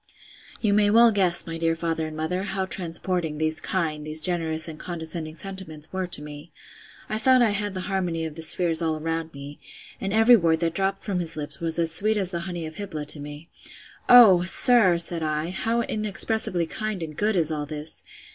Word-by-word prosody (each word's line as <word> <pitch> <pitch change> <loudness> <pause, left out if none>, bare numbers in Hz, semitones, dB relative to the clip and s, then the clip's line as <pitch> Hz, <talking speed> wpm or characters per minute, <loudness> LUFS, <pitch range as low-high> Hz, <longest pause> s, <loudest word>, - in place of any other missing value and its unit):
You 210 -3 +1
may 205 0 +3
well 230 +2 +5
guess, 185 -4 +2
my 165 0 -7
dear 165 0 0
father 165 -1 -3
and 155 0 -9
mother, 170 +4 -3
how 195 -1 -3
transporting 175 -3 -4
these 155 0 -2
kind, 160 -5 -3
these 155 +1 +1
generous 160 -1 0
and 155 -2 -9
condescending 160 -2 -5
sentiments 180 -5 -8
were 185 -1 -3
to 150 -4 -1
me!—I 150 +7 -10
thought 255 +1 +4
I 220 - +2
had 205 -1 -3
the 185 - -4
harmony 180 -4 -3
of 160 - -6
the 165 - -8
spheres 165 0 +2
all 160 -1 -1
around 165 +1 -4
me; 140 0 -11 0.4
and 195 - -3
every 225 +3 +5
word 165 -6 +1
that 165 -1 -1
dropped 195 +2 -2
from 195 -4 -3
his 165 -2 -3
lips 145 -1 -7
was 165 -1 +2
as 165 -1 +1
sweet 215 +5 +2
as 190 -3 -2
the 170 - -3
honey 175 -2 -5
of 155 0 -10
Hybla 185 -8 -6
to 150 - +2
me.—Oh! 175 +7 +2
sir, 190 0 +6
said 170 0 +4
I, 155 +2 -3
how 225 +5 -1
inexpressibly 215 -4 0
kind 215 +1 -5
and 155 -2 -8
good 210 +4 0
is 165 -3 +1
all 150 -1 -4
this! 150 +1 -6
170 Hz, 200 wpm, -24 LUFS, 160-195 Hz, 0.4 s, sir